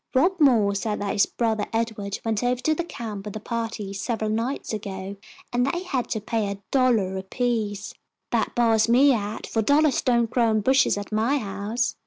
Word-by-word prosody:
"Rob 355 +8 +3
Moore 230 -9 +4
said 210 +1 -2
that 205 -1 -2
his 200 - +3
brother 220 -3 -1
Edward 220 -3 -2
went 225 0 0
over 245 0 +1
to 310 - +2
the 345 - -2
camp 220 -10 -6
with 210 0 -7
a - - -3
party, 225 -3 -4
several 215 +1 -2
nights 230 +3 -2
ago, 195 -2 -5 0.4
and 245 0 +2
they 340 +7 -1
had 270 -9 -2
to 220 - -1
pay 215 0 -1
a 200 - -5
dollar 230 -8 +2
apiece. 210 0 -2 0.4
That - - 0
bars 230 -2 +3
me 265 +4 +6
out, 210 -2 -3
for 225 - -1
dollars 285 +5 +3
don't 235 -2 +2
grow 235 -2 +3
on 215 -1 +2
bushes 265 0 +3
at 205 +1 -6
my 225 +7 +2
house. 210 +2 -2
225 Hz, 195 wpm, -24 LUFS, 205-250 Hz, 0.4 s, me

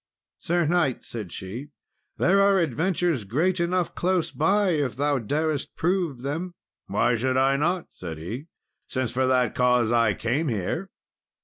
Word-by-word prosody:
"Sir 175 0 +1
knight," 160 -5 +1
said 105 -7 -6
she, 115 +10 -7 0.5
"there 195 +3 +4
are 200 0 +5
adventures 165 - 0
great 165 - 0
enough 175 0 0
close 180 -1 0
by 195 +6 +2
if 145 -7 0
thou 145 +1 +1
darest 145 +5 -2
prove 170 -7 -1
them." 165 +6 -3 0.3
"Why 120 +5 +2
should 130 +2 0
I 135 +1 +3
not," 170 +5 0
said 80 -3 -7
he, 115 - -6 0.4
"since 130 -3 -2
for 130 +1 +1
that 125 -3 +2
cause 125 -2 +3
I 115 -3 +3
came 135 +8 -1
here?" 125 - -2
145 Hz, 150 wpm, -25 LUFS, 120-175 Hz, 0.5 s, are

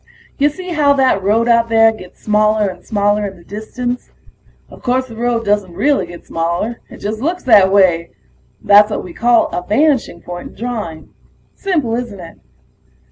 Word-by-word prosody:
Ya 290 +1 +4
see 365 +5 -9
how 295 -3 +3
that 260 -7 +2
road 220 +4 +1
out 230 -1 +3
there 225 0 +5
gets 185 -5 -13
smaller 215 0 +2
and 180 -1 -10
smaller 205 -1 0
in 195 -1 -10
the 170 - -17
distance? 245 +6 -5 0.6
Of - - -15
course 255 0 0
the 230 - -11
road 235 0 -1
doesn't 205 -3 0
really 280 +9 +1
get 175 - -12
smaller 170 +8 -2
it - - -11
just 215 +2 -5
looks 345 +6 -2
that 205 -6 +5
way. 175 -4 +3 0.5
That's 205 +1 +6
what 210 - -3
we 175 - -10
call 240 +3 +2
a 175 - -3
vanishing 235 - +1
point 175 0 -8
in - - -18
drawing. 215 -9 -6 0.4
Simple, 310 - -1
isn't 235 -4 -4
it? 165 -2 -11
220 Hz, 180 wpm, -16 LUFS, 195-245 Hz, 0.6 s, That's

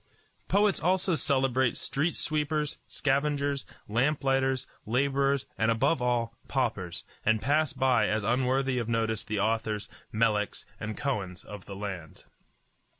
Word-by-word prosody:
Poets 205 0 +3
also 185 +2 +2
celebrate 130 -5 +2
street 150 +4 0
sweepers, 150 -1 -1
scavengers, 140 0 0 0.2
lamp 135 +8 +1
lighters, 135 -1 +2 0.2
laborers, 140 +2 +2
and 115 - +3
above 115 +6 +2
all, 120 -1 0
paupers, 105 -10 -1 0.2
and 110 0 +3
pass 150 +5 +2
by 130 -2 +3
as 110 -1 0
unworthy 130 +3 +1
of 115 -1 -3
notice 110 -2 0
the 105 -1 -2
authors, 110 0 0 0.2
Meleks, 105 -2 +1
and 105 0 -4
Kohens 105 -11 -2
of 105 -2 -9
the 100 - -7
land. 95 -6 -6
130 Hz, 130 wpm, -29 LUFS, 110-140 Hz, 0.2 s, Poets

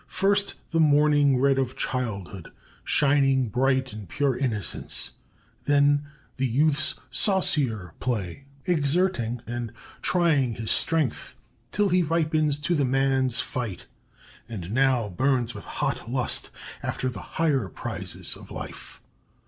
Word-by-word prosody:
First 200 +1 +1 0.2
the 165 - +1
morning 145 -2 +4
red 135 0 +3
of 130 -1 -2
childhood, 100 -8 -3 0.3
shining 135 -3 +3
bright 130 +1 +1
in 105 -3 -8
pure 140 - 0
innocence! 115 -8 -1 0.5
Then 145 0 +3 0.3
the 130 0 +1
youth's 145 +5 +2 0.2
saucier 130 - +2
play 115 0 -3 0.2
exerting 145 -7 +1
and 120 -1 -4 0.3
trying 150 -9 +2
his 110 0 -3
strength 160 -7 0 0.3
till 205 -1 +1
he 180 0 +3
ripens 155 -2 +1
to 160 +4 0
the 150 -4 +2
man's 130 -1 +2
fight, 115 -8 -5 0.6
and 95 -5 -6
now 130 -2 +2
burns 125 +5 0
with - - -9
hot - - -3
lust 125 0 0 0.3
after 130 - -3
the 115 -7 -4 0.2
higher 140 -11 +1
prizes - - -4
of - - -13
life. - - -9
135 Hz, 125 wpm, -25 LUFS, 120-150 Hz, 0.6 s, morning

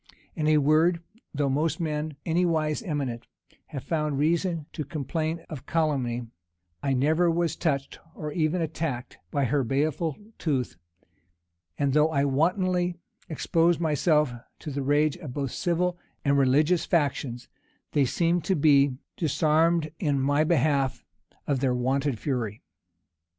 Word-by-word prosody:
In 155 -2 -1
a 155 0 +5
word, 160 +4 +3 0.3
though 145 -1 0
most 150 +3 0
men, 155 -2 -2
anywise 160 -3 +1
eminent, 140 - -3 0.4
have 135 - -6
found 150 -3 -1
reason 165 +1 +1
to 155 - -3
complain 160 +2 -3
of 145 -5 -8
Calumny, 135 -7 0 0.6
I 135 -1 0
never 160 +7 +3
was 170 0 0
touched, 140 -5 -2 0.2
or 150 -1 -5
even 165 +2 0
attacked, 155 -5 -4
by 140 -2 0
her 140 +2 +1
baleful 145 +4 0 0.2
tooth; 130 - -1 1.0
and 140 -2 +1
though 150 +2 +4
I 140 -3 +1
wantonly 180 +5 +1 0.3
exposed 165 +1 +2
myself 150 -3 +2 0.3
to 150 - -5
the 140 0 -2
rage 145 +3 +2
of 150 -8 -8
both 140 -3 -2
civil 175 0 0 0.3
and 140 0 +3
religious 145 +6 +3
factions, 140 -6 -1 0.4
they 145 -2 +3
seemed 170 +6 +1
to 190 - +2
be 140 -3 +4 0.2
disarmed 160 0 +2
in 145 -5 +1
my 145 +3 +2
behalf 145 -4 +1 0.4
of 140 -3 0
their 130 -1 +1
wonted 135 +1 0
fury. 115 -6 -3
150 Hz, 135 wpm, -27 LUFS, 140-165 Hz, 1.0 s, a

